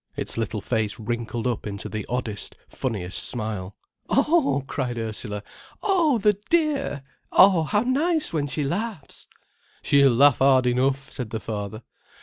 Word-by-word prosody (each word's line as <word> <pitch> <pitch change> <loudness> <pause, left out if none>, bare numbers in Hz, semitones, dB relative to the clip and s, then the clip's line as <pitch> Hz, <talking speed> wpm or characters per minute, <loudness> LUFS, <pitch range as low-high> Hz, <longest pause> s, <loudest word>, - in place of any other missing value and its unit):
Its - - -1
little 110 -2 -2
face 110 -3 -1
wrinkled 115 +1 -3
up 120 -3 -2
into 100 -1 -4
the 110 -2 -5
oddest, 120 -5 -3
funniest 100 -8 -2
smile. 105 -5 -3 0.3
"Oh!" 280 - +2
cried 125 -3 -3
Ursula. 110 -2 -4 0.4
"Oh, 345 - +3
the 210 -2 +2
dear! 295 - +1 0.3
Oh, 185 -3 +6
how 205 +6 +1
nice 300 - 0
when 145 -3 0
she 145 +2 -2
laughs!" 185 +1 -4 0.6
"She'll 140 -2 +5
laugh 140 +3 +5
hard 130 -1 +5
enough," 135 +2 0
said 125 -4 -5
the 110 - -4
father. 110 0 -5
130 Hz, 140 wpm, -24 LUFS, -, 0.6 s, Oh